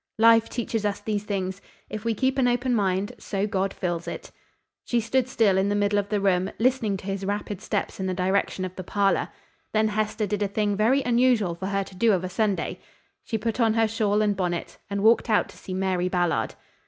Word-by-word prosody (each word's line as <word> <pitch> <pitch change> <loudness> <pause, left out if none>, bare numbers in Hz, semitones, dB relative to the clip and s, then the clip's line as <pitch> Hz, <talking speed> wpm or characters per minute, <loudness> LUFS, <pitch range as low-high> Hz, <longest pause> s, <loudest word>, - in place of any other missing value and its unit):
"Life 225 0 +5
teaches 230 -2 -2
us 205 -1 -1
these 210 -1 -3
things. 190 -1 -3 0.3
If 215 -1 -6
we 230 -1 +1
keep 265 +4 +1
an 250 - +4
open 245 +1 +1
mind, 200 -1 +1
so 200 -1 -2
God 195 -2 -1
fills 175 -3 -3
it." - - -6 0.5
She 240 - +1
stood 240 +3 +1
still 205 -6 +3
in 195 +1 +1
the 205 - +1
middle 205 0 +2
of 200 0 -3
the 210 -1 +1
room, 190 -1 +2
listening 230 -4 +1
to 185 - -12
his 195 0 -3
rapid 205 0 -3
steps 205 -2 -3
in 190 - -1
the 185 - -1
direction 190 0 0
of 185 0 -7
the 185 - -6
parlor. 200 +2 +1 0.4
Then 215 0 +3
Hester 215 0 -1
did 205 +1 -2
a 205 - +2
thing 205 0 0
very 240 +7 +3
unusual 240 -6 +3
for 190 +3 -5
her 195 0 0
to 190 - -13
do 220 +3 +3
of 185 -2 0
a 185 - -3
Sunday. 205 0 -1 0.4
She 225 - -2
put 225 +2 -3
on 225 -2 +3
her 225 -1 +3
shawl 215 -1 +1
and 205 -1 +1
bonnet 175 -3 -3
and 200 0 -2
walked 230 +2 +4
out 215 - +3
to - - -14
see 185 - -6
Mary 185 -1 0
Ballard. 175 -2 0
205 Hz, 225 wpm, -25 LUFS, 190-225 Hz, 0.5 s, Life